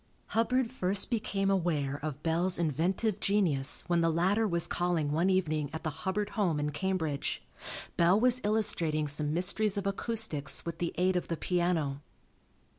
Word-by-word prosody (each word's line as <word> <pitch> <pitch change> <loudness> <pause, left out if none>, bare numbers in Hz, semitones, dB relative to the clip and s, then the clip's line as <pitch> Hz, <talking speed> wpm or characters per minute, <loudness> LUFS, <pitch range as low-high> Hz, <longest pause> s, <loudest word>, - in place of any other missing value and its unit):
Hubbard 235 +2 0
first 195 -4 0
became 195 -3 -1
aware 150 -7 -1
of 150 -1 -5
Bell's 170 +3 +1
inventive 175 - -1
genius 175 -10 +3
when 175 -1 +1
the 165 - +2
latter 190 +7 +1
was 170 -3 +1
calling 175 -4 -1
one 170 +5 +1
evening 155 -6 0
at 160 - -6
the 155 - -2
Hubbard 195 +7 -3
home 180 -9 0
in 150 0 -2
Cambridge. 160 -3 -3 0.5
Bell 175 +4 +4
was 250 +1 +4
illustrating 175 -8 0
some 150 +1 0
mysteries 190 +5 +1
of 200 - -3
acoustics 200 -7 +1
with 170 -1 -6
the 170 - -2
aid 185 +1 +1
of 180 - -2
the 165 - -3
piano. 170 -7 -1
175 Hz, 160 wpm, -30 LUFS, 155-200 Hz, 0.5 s, Bell